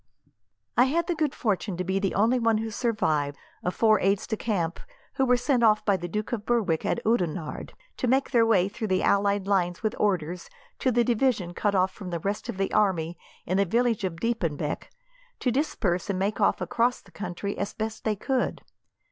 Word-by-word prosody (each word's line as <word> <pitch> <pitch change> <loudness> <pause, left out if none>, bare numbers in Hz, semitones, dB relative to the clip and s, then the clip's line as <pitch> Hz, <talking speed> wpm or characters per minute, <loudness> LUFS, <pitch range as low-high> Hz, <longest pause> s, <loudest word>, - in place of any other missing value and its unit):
"I 245 - +7
had 325 +5 +1
the 350 - 0
good 305 -4 -1
fortune 200 -4 -1
to 185 - -1
be 190 +2 0
the 195 -1 -1
only 230 +5 +3
one 230 -2 +3
who 225 0 -3
survived, 155 - 0 0.3
of 180 - -1
four 220 -1 +4
aides 195 +1 +1
de 220 - -2
camp 180 -7 -2 0.3
who 265 - +1
were 250 0 +5
sent 250 0 +1
off 215 -2 +4
by 200 - +4
the 175 -2 -4
Duke 210 +4 -3
of 230 -4 -2
Berwick, 210 -9 +1
at - - +1
Oudenarde, 180 -8 -1 0.2
to 255 - -1
make 265 +3 +2
their 235 -3 +5
way 200 -5 +3
through 215 +2 -4
the 185 -1 +1
allied 200 -1 +2
lines 185 -2 0
with 215 - 0
orders, 180 -4 -1 0.3
to 260 - +2
the 240 0 +3
division 230 -7 +1
cut 205 +2 0
off 185 0 +3
from 190 -2 -8
the 170 -1 -3
rest 200 +6 -3
of 225 - -4
the 195 0 -1
army 175 -5 +1 0.3
in 185 - 0
the 200 - +4
village 230 +2 +1
of 170 -3 -3
Diepenbeck, 170 -9 -2 0.5
to 250 - 0
disperse 210 - -1
and 195 - 0
make 200 +2 -1
off - - +3
across 245 0 +1
the 190 - -21
country, 185 +2 -4
as 200 - -4
best 220 0 -4
they 215 -1 +1
could. 255 +5 -1
205 Hz, 205 wpm, -26 LUFS, 185-235 Hz, 0.5 s, I